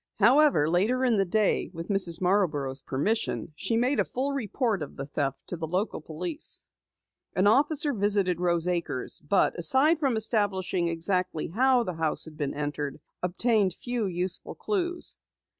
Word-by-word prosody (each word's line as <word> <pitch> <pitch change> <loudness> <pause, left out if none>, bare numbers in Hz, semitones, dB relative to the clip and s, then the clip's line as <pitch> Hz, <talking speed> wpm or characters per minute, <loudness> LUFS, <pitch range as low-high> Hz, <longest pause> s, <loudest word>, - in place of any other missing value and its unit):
However, 245 - +5
later 215 +10 +2
in 235 -4 +3
the 195 - +2
day, 210 +3 +1
with 165 +3 -7
Mrs. 190 -5 0
Marborough's 155 -8 +1
permission, 160 +3 -2
she 225 +8 -1
made 250 +4 +1
a - - +4
full 270 +3 -2
report 230 - -1
of 150 - -6
the 135 - -5
theft 140 -1 -3
to 175 - -3
local 180 +3 -2
police. 175 - -4 0.7
An 185 - +2
officer 290 +6 +3
visited 200 -4 +2
Rose 170 -1 +1
Acres, 170 -7 -1
but 195 - +3
aside 270 - +4
from 270 -7 +1
establishing 195 -5 0
exactly 170 0 0
how 250 +6 +3
the 185 -5 -4
house 160 -1 0
had 160 -1 -11
been 145 -3 -3
entered, 145 -1 -3 0.2
obtained 190 +1 +1
few 240 -4 -2
useful 180 0 -3
clues. 355 -4 -2
190 Hz, 155 wpm, -27 LUFS, 165-240 Hz, 0.7 s, However